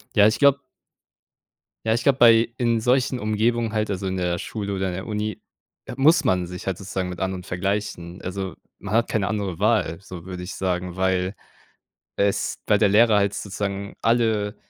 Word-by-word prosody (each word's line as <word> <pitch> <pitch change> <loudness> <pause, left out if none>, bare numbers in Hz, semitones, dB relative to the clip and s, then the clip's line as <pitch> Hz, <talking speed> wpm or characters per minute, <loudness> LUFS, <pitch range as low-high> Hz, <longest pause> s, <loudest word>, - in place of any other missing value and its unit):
Ja, 105 -1 +7
ich 110 - 0
glaube 140 -1 +5 1.2
Ja, 110 0 +3
ich 120 - -2
glaube 140 -1 +3
bei 115 -1 +6
in 115 -2 +1
solchen 125 +2 +1
Umgebungen 110 +1 0
halt, 110 -1 0
also, 100 -1 -3
in 95 0 -2
der 90 -1 0
Schule 100 +1 -4
oder 95 0 -1
in - - -4
der 95 +3 -6
Uni, 105 -2 -3 0.4
äh, - - -7
muss 155 +4 +5
man 90 -7 +1
sich 90 +1 -8
halt 95 -2 -1
sozusagen 95 -1 -4
mit 90 -1 -7
anderen 95 -1 -3
vergleichen, 90 -1 -3
also, 95 0 -4 0.2
man 100 +2 -6
hat 115 +1 +2
keine 100 -3 0
andere 100 -4 -2
Wahl, 80 - +1
so 90 -3 -10
würde 90 -1 -6
ich 90 - -6
sagen, 90 -1 -2
weil 95 0 0 0.8
es 100 0 0
weil 105 - +4
der 105 - +4
Lehrer 110 +2 +5
halt 100 0 +1
sozusagen 100 0 -4
alle 110 -3 +1
100 Hz, 190 wpm, -23 LUFS, 95-110 Hz, 1.2 s, Ja